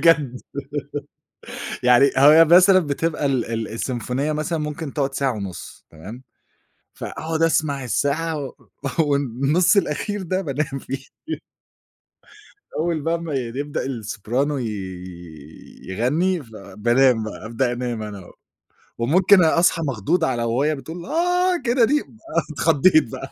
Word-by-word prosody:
بجد 145 -7 +3 1.4
يعني 125 +3 +5
هي 150 +4 +8
مثلًا 185 +3 +7
بتبقى 150 0 -1
ال 130 -4 +1
ال 115 -1 -3
السيمفونية 125 +5 -2
مثلًا 155 +2 -2
ممكن 150 -1 -4
تقعُد 140 -2 -1
ساعة 135 -1 0
ونُص 100 -5 -8
تمام، 105 +11 -10 0.7
فأقعُد 160 0 -4
أسمَع 150 -4 +1
الساعة 155 +6 -1
و 130 - -8 0.5
والنُّص 145 - +2
الأخير 200 +3 -1
ده 185 +1 -1
بانام 140 -3 -3
فيه 135 - -5 1.8
أول 160 -1 0
بقي 165 +2 0
ما 165 -3 -5
ي - - +1 0.2
يبدأ 145 0 -3
الSoprano 120 +3 -2
ي 115 - -2 1.2
يغنّي، 155 - 0
فبانام 115 +3 +1
بقى، 110 0 -7
أبدأ 115 +3 -1
انام 120 -2 -3
أنا 100 -3 -8
و - - -14 0.7
وممكن 180 +10 +5
أ 160 +1 +3
أصحى 170 -1 +3
مخضوض 135 - 0
على 120 -3 0
وهي 135 +7 +1
بتقول 165 +5 -8
آه 355 +4 +1
كده 240 -1 +4
دي 295 +5 +2
ب - - -12
أنا 195 -7 -4
اتخضّيت 155 -2 +3
بقى - - -7
145 Hz, 130 wpm, -22 LUFS, 120-165 Hz, 1.8 s, هي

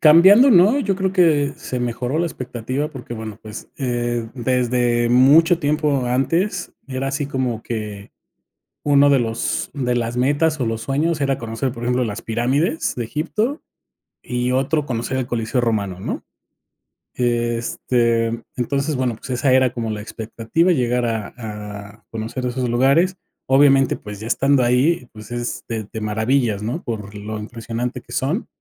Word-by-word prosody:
cambiando, 190 - +8
¿no? 210 +7 +6
Yo 195 -6 0
creo 190 -1 0
que 155 -6 +3
se 125 - -4
mejoró 125 +4 -2
la 170 - +1
expectativa 130 0 -4
porque, 125 -6 -8
bueno, 110 -2 -7
pues, 105 -1 -9
eh, 120 -3 -1
desde 120 -1 +1
mucho 150 +8 +6
tiempo 145 -3 +1
antes, 165 +10 0 0.2
era 135 0 -3
así 140 +1 -2
como 130 -5 -2
que 105 -3 -5 0.7
uno 145 0 +5
de 135 - +4
los 115 -1 -2
de 125 -3 0
las 120 0 -1
metas, 145 +5 +2
o, 120 - +1
los 115 0 -2
sueños 150 +5 0
era 135 -1 +1
conocer, 115 +3 -3
por 120 0 -7
ejemplo, 125 +1 +1
las 105 0 -4
pirámides 130 +8 0
de 120 - -2
Egipto, 210 - -2 0.6
y 125 0 -1
otro 140 +3 +1
conocer 125 +2 -2
el 130 - -1
Coliseo 120 +1 -1
Romano, 100 -6 -1
¿no? - - -4 0.9
Este, 120 -1 +1 0.3
entonces, 140 +4 -1
bueno, 125 -3 0
pues, 130 - -11
esa 130 +1 +2
era 130 -1 +4
como 115 -2 -3
la 105 - -4
expectativa, 115 - -1
llegar 125 -4 +1
a 110 -3 -3
a 105 -1 -8
conocer 115 +3 -4
esos 125 0 -2
lugares, 140 +10 +3 0.3
obviamente, 135 0 +5
pues, 105 -1 -9
ya 110 - -7
estando 135 +2 +3
ahí, 125 +3 +2
pues, 110 0 -11
es 120 0 -3
te 110 -2 -3
te 110 +2 -8
maravillas, 110 0 0
¿no? 125 +10 -3
Por 105 -3 -5
lo 105 +1 -6
impresionante 115 +3 -5
que - - -17
son, 155 - -1
125 Hz, 160 wpm, -21 LUFS, 115-140 Hz, 0.9 s, cambiando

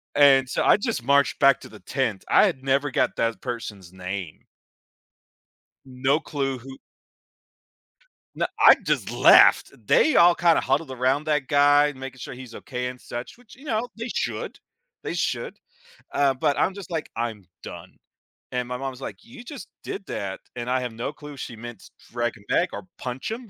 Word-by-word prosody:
And, 135 -2 +6
so, - - 0
I - - +5
just 215 - -3
marched 140 +2 +2
back 140 -1 +5
to - - -11
the - - -13
tent, 120 -8 -2
I - - +6
had 130 - -2
never 140 +2 +1
got - - +1
that 115 0 -1
person's 105 -7 -6
name. 90 -2 -7 1.4
No 135 +3 0
clue 135 -4 -3
who 135 +2 -11 1.6
Na - - 0
I - - +9
just - - 0
left, - - +6
they 310 - +4
all 170 0 +7
kinda 170 -2 +3
huddled 135 +2 0
around 130 +4 +1
that 150 -3 0
guy, 145 0 +4
making 130 -1 -9
sure 125 - -7
he's 125 -2 -11
okay 125 -1 -5
and 125 0 -9
such, 120 - -7
which, 245 -1 -18
you 275 - -16
know, 235 -2 -1
they 230 +2 -4
should. - - -3 0.4
They - - -4
should. - - -2 0.6
Uh, 140 -1 +3
but 140 +2 0
I'm 190 - +1
just 195 -2 -9
like, 160 -2 -4
"I'm 115 -4 -4 0.2
done," - - -10 0.5
and 125 -1 -2
my 125 0 -4
mom's 135 0 -6
like, - - -8
"You 240 +2 -12
just 265 -1 -9 0.2
did 195 0 -6
that," 95 -1 -4 0.2
and 120 0 -5
I 130 0 +2
have 125 -2 -4
no 115 +5 -4
clue 150 -1 -11
if - - -13
she 115 - -7
meant 120 -2 -10 0.2
drag 120 0 -2
him 100 - -19
back 180 - +2
or 185 - -7
punch 125 - -5
him? 230 -1 -6
135 Hz, 185 wpm, -24 LUFS, 120-150 Hz, 1.6 s, I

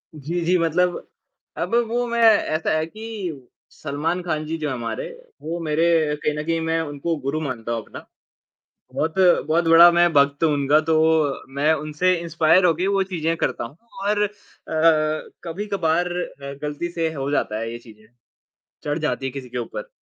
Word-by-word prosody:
जी, 155 +4 -3
जी 180 +1 +3
मतलब 175 +2 0 0.5
अब 230 - -1
वो 240 +2 -1
मैं 235 0 -1
ऐसा 205 -8 +3
है 155 - 0
कि 190 - -7 0.2
सलमान 155 +5 -3
ख़ान 155 -3 -2
जी 160 +1 -3
जो 155 -2 -3
हैं 130 - -2
हमारे, 115 -2 -4 0.3
वो 170 +2 -4
मेरे 155 +2 +1 0.4
कहीं 150 - +1
न - - -3
कहीं 165 0 0
मैं 165 0 0
उनको 150 +2 -3
गुरु 140 +4 -2
मानता 120 -5 -4
हूँ 115 -1 -1
अपना। - - -10 0.9
बहुत, 160 +2 -1 0.3
बहुत 165 +2 +2
बड़ा 165 +1 +9
मैं 175 0 +4
भक्त 140 +1 +3
हूँ 160 - +4
उनका 145 +1 +3
तो 160 - +4 0.6
मैं 145 +3 +3
उनसे 155 +4 0
इंस्पायर 165 +2 +3
होके 175 +2 +2
वो 195 -1 +2
चीज़ें 165 0 0
करता - - -1
हूँ 140 +7 -9 0.3
और 205 0 +1
अ, 205 - 0 1.1
कभी-कभार 175 -2 -1
अ, 140 -6 -5
ग़लती 150 +3 -3
से 165 -2 -1
हो 140 0 -3
जाता 110 -6 -1
है 115 0 -4
ये 120 - -6
चीज़ें, 110 -2 -17 0.8
चढ़ 150 +2 -2
जाती 150 -3 -2
है 135 - -2
किसी 130 -2 -8
के 125 - -6
ऊपर। 120 - -5
160 Hz, 175 wpm, -22 LUFS, 140-175 Hz, 1.1 s, बड़ा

